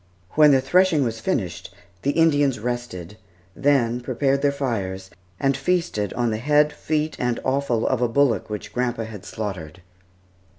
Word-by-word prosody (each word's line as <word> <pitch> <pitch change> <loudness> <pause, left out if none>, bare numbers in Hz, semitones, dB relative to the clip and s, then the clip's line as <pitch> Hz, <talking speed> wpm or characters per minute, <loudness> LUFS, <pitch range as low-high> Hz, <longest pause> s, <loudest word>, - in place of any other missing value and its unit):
When 150 -1 +6
the 135 -2 +5
threshing 170 +2 +3
was 115 -2 -3
finished, 90 -7 -3 0.3
the 140 - 0
Indians 145 -5 +3
rested; 110 -5 -5 0.4
then 125 -4 +2
prepared 140 +2 0
their 145 0 +3
fires, 95 -9 -3 0.3
and 135 0 +2
feasted 140 - -1
on 120 -2 0
the 110 - -1
head, 150 +3 +3
feet, 155 +1 -2
and 125 -1 0
offal 130 -4 0
of 130 -2 0
a 125 - +3
bullock 125 -1 +1
which 105 -1 -6
grandpa 120 -2 -1
had 105 -3 -9
slaughtered. 95 -6 -6
125 Hz, 155 wpm, -23 LUFS, 110-145 Hz, 0.4 s, When